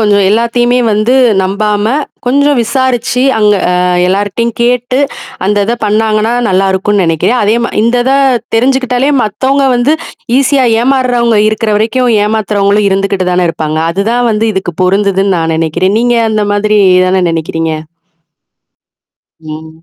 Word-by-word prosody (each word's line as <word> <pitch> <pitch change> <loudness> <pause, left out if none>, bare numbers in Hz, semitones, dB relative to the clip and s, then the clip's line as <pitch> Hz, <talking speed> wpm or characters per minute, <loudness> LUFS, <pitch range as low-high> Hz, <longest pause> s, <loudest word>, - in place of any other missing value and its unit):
கொஞ்சம் 205 -2 +2
எல்லாத்தையுமே 240 +3 +1
வந்து 215 +4 +1 0.3
நம்பாம, 205 +2 -1 0.4
கொஞ்சம் 285 +1 +2
விசாரிச்சு 250 0 -1 0.2
அங்க 210 -1 +3 0.2
ஆ - - +1 0.4
எல்லார்ட்டயும் 205 +4 -1
கேட்டு, 245 +1 0 0.5
அந்ததை 205 +3 0
பண்ணாங்கன்னா, 215 +1 0 0.2
நல்லா 190 0 +1
இருக்கும்ன்னு 195 +1 0
நினைக்கிறேன். 165 +9 0
அதே 215 +3 +1
மா - - -3
இந்தத 245 +2 +1 0.5
தெரிஞ்சுக்கிட்டாலே, 255 +2 0
மத்தவங்க 270 +6 0
வந்து 270 +6 +1 0.4
ஈஸியா 275 -1 +2 0.2
ஏமாறவங்க 245 -3 +1
இருக்கிற 215 0 -2
வரைக்கும் 235 +3 0
ஏமாத்துறவங்களும் 210 -1 0
இருந்துகிட்டுதானே 190 -2 0
இருப்பாங்க! 155 -1 -4
அதுதான் 230 +6 -1
வந்து 215 +1 -1
இதுக்கு 190 -3 -4
பொருந்துதுன்னு 195 0 +1
நான் 165 0 -1
நெனைக்கிறேன். 165 +5 -1
நீங்க 240 0 +1 0.2
அந்த 215 -1 0
மாதிரி 210 +1 +1 0.2
எதானே 185 0 +1
நெனைக்கிறீங்க? 165 0 -3 1.7
ம். 160 0 -11
215 Hz, 120 wpm, -10 LUFS, 195-245 Hz, 1.7 s, அங்க